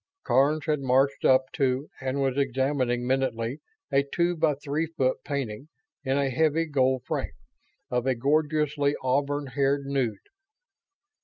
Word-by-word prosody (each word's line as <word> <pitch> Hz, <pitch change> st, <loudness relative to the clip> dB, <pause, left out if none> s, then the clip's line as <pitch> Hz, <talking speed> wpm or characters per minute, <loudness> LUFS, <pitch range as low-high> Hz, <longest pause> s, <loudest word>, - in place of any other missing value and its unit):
Karns 145 Hz, +3 st, +2 dB
had 155 Hz, -2 st, +1 dB
marched 135 Hz, +1 st, +2 dB
up 130 Hz, 0 st, +4 dB
to 135 Hz, +1 st, 0 dB
and 135 Hz, +1 st, -2 dB
was 135 Hz, -1 st, 0 dB
examining 130 Hz, -2 st, 0 dB
minutely 130 Hz, 0 st, -1 dB, 0.3 s
a 135 Hz, 0 st, +4 dB
two 170 Hz, +5 st, 0 dB
by 155 Hz, -3 st, +2 dB
three 145 Hz, +3 st, -2 dB
foot 135 Hz, -5 st, 0 dB
painting, 135 Hz, -3 st, -4 dB, 0.4 s
in 135 Hz, 0 st, 0 dB
a 140 Hz, -1 st, +1 dB
heavy 160 Hz, +4 st, +2 dB
gold 130 Hz, -4 st, +1 dB
frame, -, -, -3 dB, 0.6 s
of 125 Hz, +1 st, 0 dB
a 130 Hz, -, +2 dB
gorgeously 150 Hz, +2 st, +1 dB
auburn 140 Hz, +2 st, 0 dB
haired 140 Hz, +2 st, 0 dB
nude. 135 Hz, -6 st, -1 dB
140 Hz, 140 wpm, -26 LUFS, 130-145 Hz, 0.6 s, up